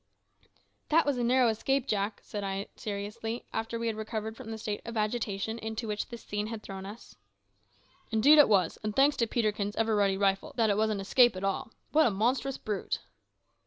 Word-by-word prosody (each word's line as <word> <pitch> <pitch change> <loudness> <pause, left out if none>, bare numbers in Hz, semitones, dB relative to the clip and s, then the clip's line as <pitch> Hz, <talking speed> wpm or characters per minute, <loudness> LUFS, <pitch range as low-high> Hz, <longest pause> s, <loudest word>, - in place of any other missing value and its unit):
"That 325 +2 +4
was 280 -3 0
a - - 0
narrow 250 +1 +4
escape, 265 +4 0
Jack," 205 -3 -1
said 205 -1 -5
I 195 0 -3
seriously, 220 +2 -5
after 225 +1 -2
we 230 - -3
had 225 -1 0
recovered 220 0 -4
from 235 -2 -9
the 225 - -4
state 210 -1 -4
of 230 -1 -6
agitation 215 0 -1
into 220 +1 -4
which 210 -1 -2
this 235 -2 -9
scene 210 0 -3
had 225 -1 -6
thrown 195 0 -7
us. 215 +4 -11 0.9
"Indeed 270 +8 +6
it 290 - +7
was; 185 -6 +2
and 215 -1 -3
thanks 280 +2 +5
to 230 - +1
Peterkin's 210 -3 -1
ever 225 -1 +1
ready 200 -2 +2
rifle 195 -1 +1
that 225 -3 +3
it 200 - +1
was 220 0 +2
an 210 -2 -1
escape 240 +3 +4
at 185 - -6
all. 195 +2 -1 0.2
What 310 0 +5
a - - +3
monstrous 245 +6 0
brute!" 210 -2 -3
220 Hz, 200 wpm, -30 LUFS, 205-235 Hz, 0.9 s, it